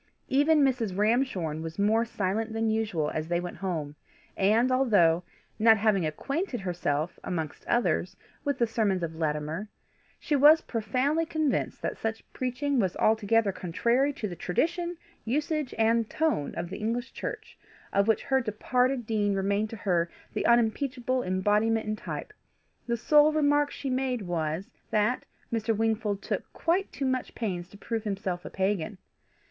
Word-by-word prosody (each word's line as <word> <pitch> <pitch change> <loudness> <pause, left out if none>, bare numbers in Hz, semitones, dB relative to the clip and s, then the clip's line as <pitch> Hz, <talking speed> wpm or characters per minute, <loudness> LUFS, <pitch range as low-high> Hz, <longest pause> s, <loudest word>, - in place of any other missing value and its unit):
Even 290 +3 +4
Mrs. 240 -8 +1
Ramshorn 205 - +1
was 165 0 -6
more 220 +3 +3
silent 220 +1 -2
than 225 0 +1
usual 210 -9 0
as 155 0 -3
they 175 0 +1
went 175 0 -6
home, 160 -6 -3 0.4
and 220 +6 +3
although 205 -11 +4 0.4
not 220 0 +6
having 200 -5 +2
acquainted 275 - -3
herself, 170 -3 -2
amongst 160 -4 -4
others, 180 -6 +1 0.3
with 285 -2 0
the 235 - +3
sermons 215 -5 0
of 165 -1 -3
Latimer 155 +5 -2 0.5
she 300 - 0
was 300 +3 +7
profoundly 255 +8 0
convinced 315 -3 -1
that - - -3
such 225 0 -3
preaching 260 +2 -1
was 190 -4 +1
altogether 220 -1 +3
contrary 235 +11 +1
to 215 - -4
the 175 - -6
tradition, 345 - -1 0.3
usage, 295 +3 -1
and 225 0 +2
tone 310 - 0
of 175 - -4
the 195 - -5
English 235 +4 -2
Church, - - -6 0.4
of 200 +1 +3
which 225 - +2
her 265 -1 +2
departed 250 +3 0
dean 210 -2 +1
remained 200 +2 0
to 225 - -6
her 175 -4 +1 0.2
the - - 0
unimpeachable 245 +2 +2
embodiment 210 +3 +1
and 215 0 -3
type, - - -6 0.5
the 235 0 0
sole 300 +5 +5
remark 290 -1 +3
she 280 - -6
made 255 -3 -1
was, 165 0 -2 0.2
that 215 +4 +1 0.3
Mr. 225 -1 0
Wingfold 220 -2 0
took - - -3
quite 360 +4 0
too 275 - -3
much 260 -1 -1
pains 180 -6 -3
to 200 - -14
prove 225 +1 -3
himself 195 -4 -3
a - - -7
pagan. 190 -1 -1
220 Hz, 155 wpm, -28 LUFS, 190-255 Hz, 0.5 s, was